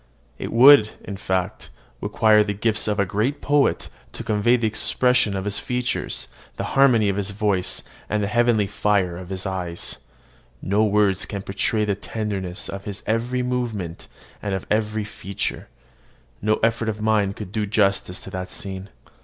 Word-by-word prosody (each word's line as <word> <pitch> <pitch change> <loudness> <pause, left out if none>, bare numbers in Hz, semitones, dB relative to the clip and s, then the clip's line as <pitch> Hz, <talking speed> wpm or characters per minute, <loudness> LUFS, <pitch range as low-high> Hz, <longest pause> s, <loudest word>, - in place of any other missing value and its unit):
It - - -4
would, 125 -1 +8
in 100 - -6
fact, 95 +1 -2 0.3
require 110 -1 +4
the 105 -1 -3
gifts 105 +1 0
of 105 -1 0
a 100 - +3
great 110 +10 -1
poet 145 -1 +2 0.3
to - - -6
convey 110 +3 +3
the 120 -2 0
expression 110 0 +3
of 95 0 -3
his 105 0 0
features, 125 0 -2 0.3
the - - -2
harmony 125 -6 +5
of 100 0 0
his 100 -1 -2
voice, 100 -3 0 0.3
and 105 -1 0
the - - 0
heavenly 120 -1 +3
fire 100 -3 0
of 90 0 -9
his 95 0 -4
eye. 90 -3 -3 0.8
No 100 +3 +1
words 100 -3 +2
can 100 -2 -5
portray 105 +3 0
the 105 - +1
tenderness 100 -3 -4
of 95 0 -7
his 100 -1 -6
every 120 +3 0
movement 115 -9 -3 0.3
and 100 -2 -2
of 95 - -5
every 110 0 0
feature: 100 -2 -5 0.7
no 110 +1 +2
effort 115 0 +1
of 105 -1 -4
mine 105 -2 +2
could 100 -2 -8
do 105 -1 -1
justice 100 -3 +1
to 95 - -9
the 95 0 -4
scene. 95 +1 -6
105 Hz, 170 wpm, -23 LUFS, 95-110 Hz, 0.8 s, would